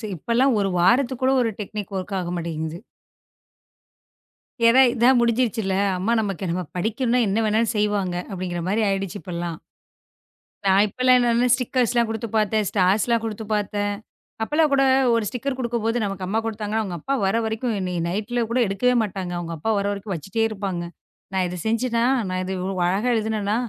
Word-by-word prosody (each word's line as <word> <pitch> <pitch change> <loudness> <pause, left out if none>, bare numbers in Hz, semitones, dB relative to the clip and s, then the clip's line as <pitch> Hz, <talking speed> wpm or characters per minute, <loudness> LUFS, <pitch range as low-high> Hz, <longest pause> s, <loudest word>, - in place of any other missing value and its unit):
இப்பெல்லாம் 235 - +2
ஒரு 195 -1 0
வாரத்துக்கு 245 +7 +2
கூட 265 - +4
ஒரு 225 - 0
டெக்னிக் 205 0 -6
வொர்க் 190 +1 -3
ஆக 175 -1 -4
மாட்டேங்குது. 165 -1 -4 1.9
ஏன்னா 250 +3 +6
இதான் 245 +1 +4
முடிஞ்சிருச்சுல்ல. 230 -4 +1 0.2
அம்மா 200 +6 0
நமக்கு 195 -3 -3
நம்ம 180 +1 -2
படிக்கணும்ன்னா 235 +6 +1
என்னா 210 +3 +1
வேணாலும் 220 +2 +1
செய்வாங்க 205 -4 0 0.2
அப்படிங்குற 180 -2 -4
மாரி 210 +4 +1
ஆயிடுச்சு 195 0 -2
இப்பல்லாம். 170 -2 -5 1.1
நான் 195 0 +5
இப்பெல்லாம் 255 +4 +3
என்னான்னா 240 0 +2
ஸ்டிக்கர்ஸ்லாம் 245 -2 +1
குடுத்து 225 +1 -4
பாத்தேன். 215 0 +1
ஸ்டார்ஸ்லாம் 210 +4 +2
குடுத்து 220 -1 -4
பாத்தேன் 205 0 -1 0.5
அப்பல்லாம் 300 +5 +2
கூட 275 -1 +4 0.3
1 230 -1 +2
ஸ்டிக்கர் 255 +5 -3
குடுக்கும்போது, 235 -2 -1
நமக்கு 195 -2 -3
அம்மா 210 +4 0
குடுத்தாங்கன்னு 220 -1 -2
அவுங்க 185 -5 -4
அப்பா 275 - -2
வர்ற 195 +3 +2
வரைக்கும் 220 +2 -2
என்னய 180 -2 -2
நைட்ல 215 +6 -2
கூட 240 +2 +1
எடுக்கவே 225 +6 +1
மாட்டாங்க. 190 -4 -4
அவுங்க 170 -1 -5
அப்பா 220 +9 -1
வர்ற 200 0 0
வரைக்கும் 200 0 -4
வச்சுட்டே 195 +8 -2
இருப்பாங்க. 195 -5 -4 0.5
"நான் 190 -1 +1
இத 180 - -5
செஞ்சேன்னா! 230 +1 +1 0.3
நான் 185 0 -2
இது 185 - -4
இவ்வளவு 185 0 -2
அழகா 200 +7 0
எழுதினேனா! 215 -2 -1
210 Hz, 160 wpm, -23 LUFS, 190-235 Hz, 1.9 s, ஏன்னா